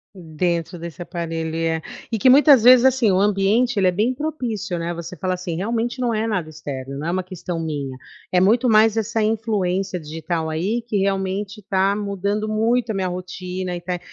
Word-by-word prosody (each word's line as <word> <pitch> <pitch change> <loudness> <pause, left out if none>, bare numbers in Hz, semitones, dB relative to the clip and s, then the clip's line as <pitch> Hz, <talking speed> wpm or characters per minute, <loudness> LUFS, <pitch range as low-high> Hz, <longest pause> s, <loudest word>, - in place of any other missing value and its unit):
Dentro 170 0 -2
desse 170 0 -8
aparelho, 165 -2 -4
é. 165 0 -1 0.3
E 225 - -1
que 255 - +5
muitas 280 -1 +7
vezes 250 +2 +7
assim, 260 -5 +4
o 185 - +2
ambiente 210 +4 +2
ele 190 - +3
é - - +4
bem 215 +8 +1
propício, 240 - -3
né. 170 +1 -3
Você 170 +1 -7
fala 185 -1 -1
assim: 180 -2 -4
"Realmente 230 +6 -2
não 245 -2 0
é 220 +1 0
nada 185 -7 -1
externo, 140 -3 -6
não 155 - -4
é - - 0
uma 185 +1 -1
questão 180 -2 -5
minha, 145 -5 -4 0.3
é 180 - +4
muito 230 +7 +3
mais 220 0 +5
essa 225 0 0
influência 200 -4 -1
digital 160 +1 -4
aí 200 +9 -1
que 215 - -1
realmente 195 +1 -1
está 195 0 +1
mudando 205 +1 -2
muito 225 +2 +1
a - - -2
minha 190 -2 -1
rotina 180 0 -5
e 175 - -4
está", 180 0 -4
190 Hz, 195 wpm, -21 LUFS, 170-220 Hz, 0.3 s, muitas